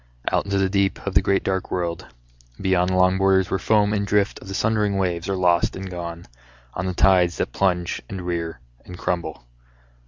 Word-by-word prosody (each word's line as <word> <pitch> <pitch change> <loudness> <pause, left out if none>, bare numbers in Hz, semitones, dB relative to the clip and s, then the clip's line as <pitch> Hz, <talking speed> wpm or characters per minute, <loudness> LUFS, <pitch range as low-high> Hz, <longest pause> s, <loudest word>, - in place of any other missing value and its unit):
Out - - +1
into 100 0 -1
the 95 0 +2
deep 100 0 +1
of - - -2
the - - +5
great 100 0 +1
dark 95 -1 -2
world, 85 -2 -3 0.5
Beyond 95 -2 +2
the 95 - 0
long 90 +1 +3
borders 95 -1 +3
where 95 - 0
foam 105 -1 +2
and 100 -1 -1
drift 100 0 +1
Of - - -13
the 95 - -5
sundering 105 -2 +1
waves 90 -2 -1
are 95 - 0
lost 90 -1 +2
and 95 0 -6
gone 85 -1 -6 0.5
On 95 0 -3
the 90 - -3
tides 90 -2 +4
that - - -2
plunge 90 -2 0
and 95 -2 -6
rear 85 -6 -3 0.2
and 90 - -10
crumble. 85 -6 -3
95 Hz, 205 wpm, -23 LUFS, 90-95 Hz, 0.5 s, the